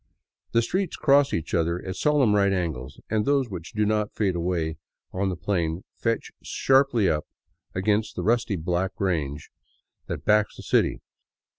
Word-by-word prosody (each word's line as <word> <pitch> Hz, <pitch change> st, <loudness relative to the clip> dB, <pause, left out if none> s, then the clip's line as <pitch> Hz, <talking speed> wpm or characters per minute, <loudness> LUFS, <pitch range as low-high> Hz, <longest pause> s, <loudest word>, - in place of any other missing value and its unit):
The 115 Hz, 0 st, +4 dB
streets 185 Hz, +8 st, -1 dB
cross 140 Hz, 0 st, +4 dB
each 80 Hz, -, -3 dB
other 85 Hz, 0 st, +1 dB
at 95 Hz, -1 st, -4 dB
solemn 145 Hz, -6 st, +3 dB
right 100 Hz, -1 st, +3 dB
angles, 80 Hz, -9 st, -3 dB
and 110 Hz, -1 st, +2 dB
those 140 Hz, -3 st, +1 dB
which 85 Hz, -3 st, -7 dB
do 105 Hz, 0 st, +1 dB
not 105 Hz, 0 st, 0 dB
fade 100 Hz, -4 st, +1 dB
away 85 Hz, -2 st, -1 dB, 0.4 s
on 95 Hz, +1 st, 0 dB
the 90 Hz, -, -2 dB
plain 85 Hz, -2 st, -1 dB
fetch 115 Hz, -1 st, -2 dB
sharply 130 Hz, -6 st, +3 dB
up 75 Hz, -3 st, 0 dB, 0.5 s
against 105 Hz, +3 st, 0 dB
the -, -, -3 dB
rusty 115 Hz, -2 st, +1 dB
black 90 Hz, +2 st, -2 dB
range 80 Hz, -6 st, -2 dB, 0.6 s
that -, -, -5 dB
backs 105 Hz, 0 st, +3 dB
the -, -, -9 dB
city. -, -, +1 dB
100 Hz, 160 wpm, -25 LUFS, 85-115 Hz, 0.6 s, The